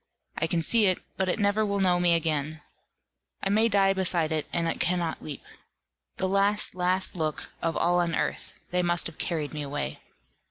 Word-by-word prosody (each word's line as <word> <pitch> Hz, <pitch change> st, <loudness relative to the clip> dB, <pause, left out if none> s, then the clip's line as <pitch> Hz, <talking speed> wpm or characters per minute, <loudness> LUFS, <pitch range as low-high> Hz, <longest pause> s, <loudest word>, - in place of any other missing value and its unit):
I 165 Hz, -, 0 dB
can 165 Hz, 0 st, -1 dB
see 220 Hz, +4 st, +4 dB
it, 185 Hz, -, +3 dB, 0.2 s
but 190 Hz, -1 st, -1 dB
it -, -, 0 dB
never 205 Hz, 0 st, +2 dB
will 200 Hz, -1 st, -1 dB
know 180 Hz, -2 st, +3 dB
me 175 Hz, -1 st, +4 dB
again; 155 Hz, -1 st, -1 dB, 0.8 s
I 195 Hz, -, 0 dB
may 220 Hz, +3 st, +3 dB
die 195 Hz, -2 st, +3 dB
beside 175 Hz, -4 st, +1 dB
it, 155 Hz, -1 st, -2 dB
and 170 Hz, -1 st, 0 dB
it -, -, -2 dB
cannot 175 Hz, -2 st, -1 dB
weep. 150 Hz, -3 st, -8 dB, 0.7 s
The 190 Hz, -, 0 dB
last 200 Hz, +2 st, +2 dB
last 185 Hz, +1 st, +1 dB
look 155 Hz, -3 st, -3 dB
of 165 Hz, 0 st, -1 dB
all 175 Hz, +1 st, +2 dB
on 170 Hz, -2 st, 0 dB
earth -, -, -3 dB, 0.2 s
they 180 Hz, 0 st, +1 dB
must 175 Hz, -1 st, +2 dB
have 165 Hz, -, -6 dB
carried 155 Hz, -4 st, -2 dB
me 150 Hz, -, -4 dB
away. 140 Hz, -, -4 dB
175 Hz, 195 wpm, -27 LUFS, 160-195 Hz, 0.8 s, see